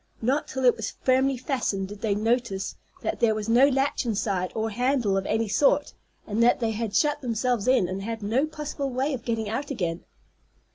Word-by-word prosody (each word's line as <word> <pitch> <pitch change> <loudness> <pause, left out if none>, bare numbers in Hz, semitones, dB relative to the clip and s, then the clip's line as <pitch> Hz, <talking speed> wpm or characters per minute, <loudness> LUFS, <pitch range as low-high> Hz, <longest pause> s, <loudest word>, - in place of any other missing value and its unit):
Not 265 +6 0
till 265 -1 -2
it 245 - +6
was 220 - -5
firmly 265 +1 +3
fastened 235 -7 -2
did 205 0 -9
they 210 -3 +1
notice 220 -2 0 0.3
that - - -2
there 220 -2 +3
was 215 0 -4
no 240 +4 +6
latch 270 +2 0
inside, 200 -5 -1
or 220 0 -1
handle 245 -2 +1
of 195 0 -1
any 220 +1 0
sort, 210 +8 +2 0.3
and 215 +2 -1
that 240 +1 +4
they 230 -2 0
had 220 -2 -3
shut 295 -1 +2
themselves 240 -2 -1
in, 255 -8 +4
and 190 +2 -4
had 225 +1 -5
no 245 +9 +1
possible 300 -2 -4
way 265 +3 -1
of 245 -3 -5
getting 225 -2 -1
out 250 +7 -3
again. 175 - -3
230 Hz, 200 wpm, -26 LUFS, 210-260 Hz, 0.3 s, it